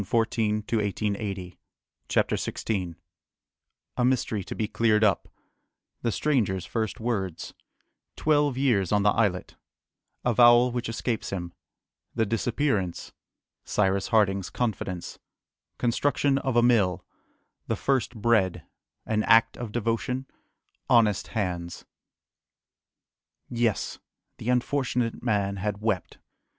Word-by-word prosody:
[Illustration: 110 +1 0
THE 115 - +1
EXPERIMENT] 100 -3 -3 0.5
CHAPTER - - +2
XVI 90 -6 -3 1.0
A 125 - +2
Mystery 120 -5 +1
to - - -6
be 110 - -1
cleared 110 0 +2
up 105 -3 +2 0.7
The 115 - 0
Stranger's 105 - 0
first 110 +1 -3
Words 100 -8 -3 0.6
Twelve 145 -3 +2
Years 115 -10 +2
on 105 -1 +3
the 105 - +5
Islet 100 -5 0 0.7
Avowal 120 +1 +6
which 120 -1 -3
escapes 115 0 -2
him 85 -3 -5 0.6
The 115 -1 +2
Disappearance 110 - -1 0.5
Cyrus 100 -1 +1
Harding's 100 -4 +2
Confidence 95 -6 -3 0.6
Construction 135 +3 +1
of 130 -3 -2
a 120 - +5
Mill 105 -7 +2 0.6
The - - 0
first 130 -3 0
Bread 110 -4 +1 0.4
An 110 -1 0
Act 115 +1 +4
of 120 -3 -6
Devotion 120 +3 -1 0.6
Honest 110 -5 +4
Hands. 90 -5 -3 1.6
Yes! 115 -3 -1 0.4
the 115 - -4
unfortunate 125 -2 0
man 100 -4 0
had 100 +1 -3
wept! 105 -4 -2
110 Hz, 110 wpm, -26 LUFS, 100-120 Hz, 1.6 s, Avowal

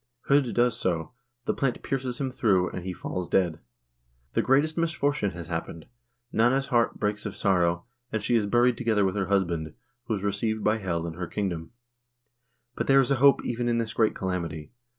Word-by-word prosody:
H0d 140 -3 +3
does 120 -1 +3
so; 85 -3 -1 0.3
the - - +1
plant 135 -3 -1
pierces 130 -2 -2
him 135 -2 -1
through, 95 -8 +2
and 90 - -6
he 95 - -3
falls 90 0 -5
dead. 85 -4 +1 0.7
The - - +2
greatest 145 +4 +2
misfortune 145 -9 0
has 85 -2 -7
happened; 80 -1 -5 0.5
Nanna's 130 +4 +2
heart 120 -2 +2
breaks 105 0 -1
of 105 - -7
sorrow, 85 -4 +2 0.3
and 110 -2 -2
she 120 - +2
is 105 -3 +2
buried 120 +2 +3
together 110 -4 +2
with 95 - 0
her 95 -2 -1
husband, 85 -6 0 0.3
who 110 - -1
is 100 - -5
received 105 +2 -1
by 110 +1 +2
Hel 85 -4 -2
in 85 - -4
her 90 +1 -5
kingdom. 85 -6 -3 1.1
But - - -2
there 135 0 +6
is 135 0 +2
a 135 - +3
hope 140 +2 +5
even 120 0 -1
in 120 - +1
this 115 -1 -2
great 110 -2 +2
calamity. 85 -4 -4
105 Hz, 190 wpm, -27 LUFS, 90-125 Hz, 1.1 s, there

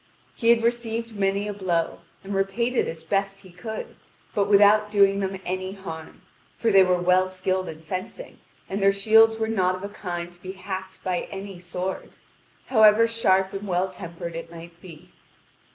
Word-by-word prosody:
He 230 - 0
had 235 -1 +5
received 230 -1 -2
many 200 +1 0
a 205 - -3
blow, 175 -4 -1 0.2
and 195 +1 -5
repaid 195 +6 0
it - - +2
as 160 0 -7
best 195 +3 -1
he 185 - -15
could, 215 +5 -7 0.4
but 200 -1 +1
without 210 +1 +5
doing 200 -1 +4
them 190 -1 -3
any 185 +1 -3
harm, 165 -5 -9 0.3
for 230 - +1
they 195 -1 +7
were 180 -1 +3
well 180 +1 +3
skilled 185 0 -2
in 160 0 -10
fencing, 185 - -6 0.3
and 195 +1 -3
their 195 0 +5
shields 225 +3 +5
were 220 0 -1
not 185 -5 +1
of 185 - -9
a 200 - -4
kind 175 -3 -6
to 175 - -21
be 190 0 -7
hacked 190 0 -7
by 180 -2 -2
any 195 -2 -7
sword, 180 +1 -5 0.5
however 220 -1 +6
sharp 190 -4 +2
and 195 +1 -5
well 185 +1 0
tempered 170 -2 -7
it 165 0 -6
might 170 0 -12
be. 180 0 -13
195 Hz, 185 wpm, -25 LUFS, 180-210 Hz, 0.5 s, they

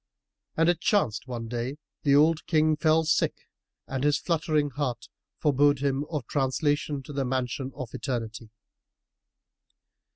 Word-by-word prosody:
And 165 +1 +4
it 175 -1 +3
chanced 150 - +1
that - - -8
one 115 -2 -4
day 120 +3 -3 0.3
the 140 -1 +4
old 155 +2 +3
King 155 -1 +3
fell 160 +1 +3
sick 160 - +2 0.5
and 135 0 -3
his 145 0 +3
fluttering 155 -4 0
heart 130 -3 -3 0.3
forebode 145 0 +3
him 140 +1 -1
of 150 -6 -3
translation 145 +1 0
to 145 - -9
the 140 -1 0
Mansion 130 +1 -2
of 130 -5 -7
Eternity. 115 -3 -4
145 Hz, 140 wpm, -27 LUFS, 130-155 Hz, 0.5 s, And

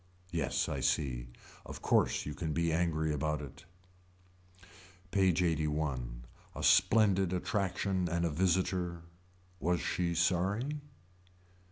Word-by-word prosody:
Yes 85 -5 0
I 70 - -3
see. 65 -3 0 0.4
Of - - -9
course - - +2
you 75 - -4
can 80 0 -3
be 85 +1 +1
angry 80 -2 +1
about 75 +1 -1
it. 70 +3 -10 1.5
PAGE 95 -3 +3
LXXXI. 75 -7 -1 0.3
A - - -5
splendid 100 -5 +4
attraction 95 0 -1
and 85 +1 0
a 85 - 0
visitor. 90 0 0 0.6
Was 90 0 +1
she 85 +2 -1
sorry. 95 - 0
85 Hz, 115 wpm, -32 LUFS, 75-90 Hz, 1.5 s, splendid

